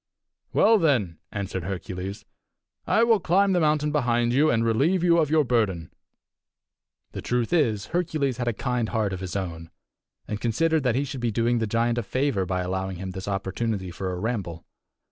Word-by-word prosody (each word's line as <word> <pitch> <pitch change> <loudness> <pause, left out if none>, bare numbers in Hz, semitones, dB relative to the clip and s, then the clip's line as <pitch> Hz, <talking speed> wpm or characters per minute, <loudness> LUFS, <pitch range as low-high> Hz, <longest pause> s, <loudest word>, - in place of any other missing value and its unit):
"Well, 225 0 +5
then," 120 - +1
answered 100 -2 -4
Hercules, 95 +1 -5 0.6
"I 225 - +4
will 230 -2 +4
climb 195 +3 +3
the 180 - +3
mountain 150 -1 +2
behind 120 -4 +1
you, 150 +4 +4
and 115 0 +2
relieve 150 +11 +2
you 170 -1 +4
of 155 -3 +2
your 155 0 +4
burden." 105 - 0 1.2
The - - -6
truth 120 +4 -1
is, 115 - +2
Hercules 155 -7 0
had 120 -1 -3
a 120 - +1
kind 120 0 -2
heart 110 -4 -1
of 95 - -4
his 95 -1 -6
own, 85 -4 -4 0.6
and 105 -1 -4
considered 160 +8 +1
that 120 -2 +2
he 135 - +1
should 135 -2 -6
be 120 - +1
doing 115 +2 +1
the 110 - -1
giant 115 +2 +1
a - - 0
favour 120 -5 -1
by 90 0 -1
allowing 95 0 -3
him 95 +1 -5
this 95 +2 -7
opportunity 100 0 -2
for 95 +2 -4
a 90 - -4
ramble. 95 -7 -3
115 Hz, 185 wpm, -25 LUFS, 95-145 Hz, 1.2 s, Well